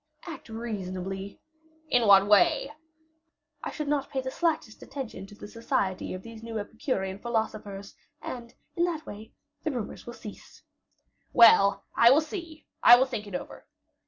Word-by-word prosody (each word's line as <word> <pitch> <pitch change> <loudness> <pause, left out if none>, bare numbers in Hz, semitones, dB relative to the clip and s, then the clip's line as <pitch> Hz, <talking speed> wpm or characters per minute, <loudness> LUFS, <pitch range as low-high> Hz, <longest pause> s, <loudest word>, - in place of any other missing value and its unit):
"Act 325 -8 -9
reasonably." 195 -4 -5 0.5
"In 245 -6 +3
what 195 -1 +8
way?" 210 +7 +4 0.9
"I - - -3
should 300 -2 -5
not 285 -1 0
pay 265 - -2
the 260 0 -4
slightest 315 -8 -1
attention 260 -8 -7
to 205 - -14
the 205 - -10
society 200 -5 -2
of 185 - -9
these 230 -1 -10
new 230 -1 -5
Epicurean 205 -3 -3
philosophers; 215 -3 -3 0.3
and, 235 -2 -8 0.2
in 345 - +1
that 325 -3 -3
way, 215 +2 -10 0.3
the 315 - 0
rumors 240 -6 -5
will 240 - -6
cease." 210 -3 -12 0.7
"Well, 200 -4 +6
I 235 - +7
will 275 +4 +6
see; 320 0 -8 0.2
I 240 - +10
will 255 +2 +3
think 235 -6 -5
it 200 - -6
over." - - -7
225 Hz, 160 wpm, -28 LUFS, 200-265 Hz, 0.9 s, I